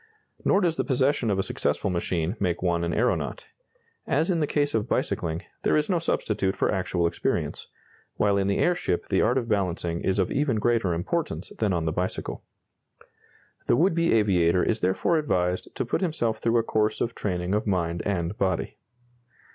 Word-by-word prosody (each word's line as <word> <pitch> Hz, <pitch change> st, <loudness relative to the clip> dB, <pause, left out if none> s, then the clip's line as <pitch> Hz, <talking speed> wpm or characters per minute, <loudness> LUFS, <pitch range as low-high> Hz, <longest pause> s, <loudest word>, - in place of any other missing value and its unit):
Nor 195 Hz, -, +3 dB
does 170 Hz, -3 st, +1 dB
the -, -, +1 dB
possession 130 Hz, -2 st, +1 dB
of 100 Hz, -, +1 dB
a 95 Hz, -, +1 dB
successful 100 Hz, -, -1 dB
machine 85 Hz, +1 st, -1 dB
make 90 Hz, -2 st, -1 dB
one 85 Hz, -1 st, +1 dB
an 85 Hz, -, -1 dB
aeronaut. -, -, -1 dB, 0.6 s
As 155 Hz, +7 st, +2 dB
in 170 Hz, -, +1 dB
the 150 Hz, -, +1 dB
case 145 Hz, 0 st, 0 dB
of 110 Hz, +1 st, -1 dB
bicycling, 85 Hz, -, -1 dB, 0.2 s
there -, -, +2 dB
is 150 Hz, +5 st, 0 dB
no 175 Hz, -, +2 dB
substitute 105 Hz, -11 st, 0 dB
for -, -, +1 dB
actual 95 Hz, -3 st, 0 dB
experience, 85 Hz, -, -2 dB, 0.5 s
while 100 Hz, -1 st, +2 dB
in 100 Hz, -1 st, +1 dB
the 100 Hz, -, +1 dB
airship 175 Hz, -, 0 dB
the 95 Hz, -, +2 dB
art 120 Hz, +4 st, +2 dB
of 120 Hz, -3 st, -1 dB
balancing 90 Hz, -5 st, -1 dB
is 95 Hz, -, 0 dB
of 95 Hz, -3 st, +1 dB
even 140 Hz, -5 st, +1 dB
greater 110 Hz, -5 st, +1 dB
importance 150 Hz, -, -2 dB
than 105 Hz, -3 st, +1 dB
on 85 Hz, -3 st, 0 dB
the 80 Hz, -, 0 dB
bicycle. 90 Hz, +3 st, -3 dB, 1.2 s
The -, -, +4 dB
would 170 Hz, +7 st, +3 dB
be 170 Hz, 0 st, +2 dB
aviator 90 Hz, -5 st, +3 dB
is 115 Hz, -, 0 dB
therefore 95 Hz, -, +1 dB
advised 90 Hz, -11 st, 0 dB
to -, -, -1 dB
put -, -, -1 dB
himself 120 Hz, -11 st, 0 dB
through 115 Hz, +1 st, +2 dB
a 115 Hz, -, +3 dB
course 110 Hz, -1 st, 0 dB
of 115 Hz, -, -1 dB
training 90 Hz, -3 st, -2 dB
of 105 Hz, +1 st, 0 dB
mind 85 Hz, -3 st, 0 dB
and 90 Hz, -1 st, -1 dB
body. 95 Hz, -3 st, -1 dB
100 Hz, 185 wpm, -26 LUFS, 90-130 Hz, 1.2 s, The